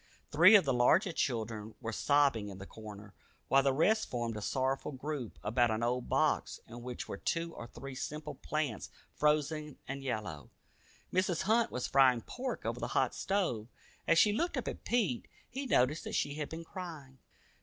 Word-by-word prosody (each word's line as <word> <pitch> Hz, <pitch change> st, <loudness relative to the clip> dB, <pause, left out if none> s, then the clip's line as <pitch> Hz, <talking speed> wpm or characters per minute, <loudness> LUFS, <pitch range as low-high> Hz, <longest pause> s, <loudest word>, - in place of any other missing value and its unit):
Three 175 Hz, +8 st, +8 dB
of 200 Hz, -, +6 dB
the 135 Hz, -, +2 dB
larger 125 Hz, +10 st, +4 dB
children 110 Hz, -7 st, -2 dB
were 115 Hz, -2 st, -4 dB
sobbing 140 Hz, -6 st, +2 dB
in 95 Hz, -, -8 dB
the 95 Hz, -, -8 dB
corner, 105 Hz, -1 st, -10 dB, 0.4 s
while 135 Hz, -, +6 dB
the 135 Hz, 0 st, +3 dB
rest 210 Hz, +11 st, +2 dB
formed 120 Hz, -2 st, -2 dB
a 105 Hz, -, -5 dB
sorrowful 135 Hz, +6 st, -1 dB
group 135 Hz, -3 st, -5 dB
about 120 Hz, +3 st, +2 dB
an 110 Hz, +1 st, -1 dB
old 125 Hz, +1 st, -1 dB
box -, -, +1 dB
in 120 Hz, +1 st, -9 dB
which 125 Hz, 0 st, -6 dB
were -, -, -5 dB
two 165 Hz, -, -2 dB
or 120 Hz, -, -8 dB
three 135 Hz, +3 st, -9 dB
simple 150 Hz, +3 st, -5 dB
plants 150 Hz, -9 st, -3 dB, 0.2 s
frozen 150 Hz, 0 st, 0 dB
and 135 Hz, +1 st, -4 dB
yellow. 105 Hz, -, -4 dB, 0.6 s
Mrs. 185 Hz, -2 st, +1 dB
Hunt 225 Hz, +3 st, +3 dB
was 125 Hz, -, -2 dB
frying 130 Hz, -3 st, +5 dB
pork 255 Hz, -, -5 dB
over -, -, -2 dB
the -, -, -2 dB
hot -, -, +2 dB
stove. 175 Hz, -, -1 dB, 0.4 s
As 165 Hz, -, +5 dB
she 210 Hz, +4 st, +6 dB
looked 340 Hz, +11 st, -1 dB
up -, -, -3 dB
at -, -, -5 dB
Pete, 210 Hz, -, 0 dB, 0.2 s
he 270 Hz, +2 st, -5 dB
noticed 145 Hz, -, +2 dB
that -, -, -3 dB
she 145 Hz, -, 0 dB
had 150 Hz, -1 st, -4 dB
been 165 Hz, +1 st, -6 dB
crying. 160 Hz, -8 st, -8 dB
135 Hz, 185 wpm, -33 LUFS, 120-165 Hz, 0.6 s, Three